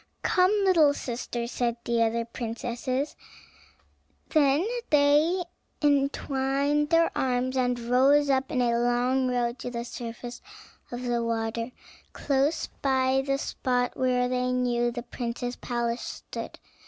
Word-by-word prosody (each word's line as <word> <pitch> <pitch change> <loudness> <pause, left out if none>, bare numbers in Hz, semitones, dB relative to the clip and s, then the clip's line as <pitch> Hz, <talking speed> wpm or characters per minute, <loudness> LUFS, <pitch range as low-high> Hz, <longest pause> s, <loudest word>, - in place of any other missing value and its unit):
"Come, 365 0 +4
little 325 -7 +5
sister," 240 -2 -4
said 235 -1 -1
the 235 -1 +1
other 230 +1 +1
princesses; 245 +4 -3 1.1
then 300 +3 +3 0.2
they 300 +5 +4 0.4
entwined 280 0 +1
their 330 0 +3
arms 255 0 0
and 250 -1 +1
rose 265 +5 +4
up 265 -1 +1
in 255 - +1
a 235 -1 +2
long 245 +2 +1
row 245 -1 0
to - - -4
the 235 -1 -4
surface 240 0 -7 0.5
of 245 +1 -5
the 240 -1 0
water, 230 0 -2 0.4
close 285 +3 0 0.2
by 265 -1 +2
the 275 0 0
spot 250 -3 -1
where 250 -1 +1
they 250 0 0
knew 240 -1 +1
the 240 0 -5
prince's 245 0 -4
palace 235 -1 -2
stood. - - -7
250 Hz, 130 wpm, -27 LUFS, 240-275 Hz, 1.1 s, little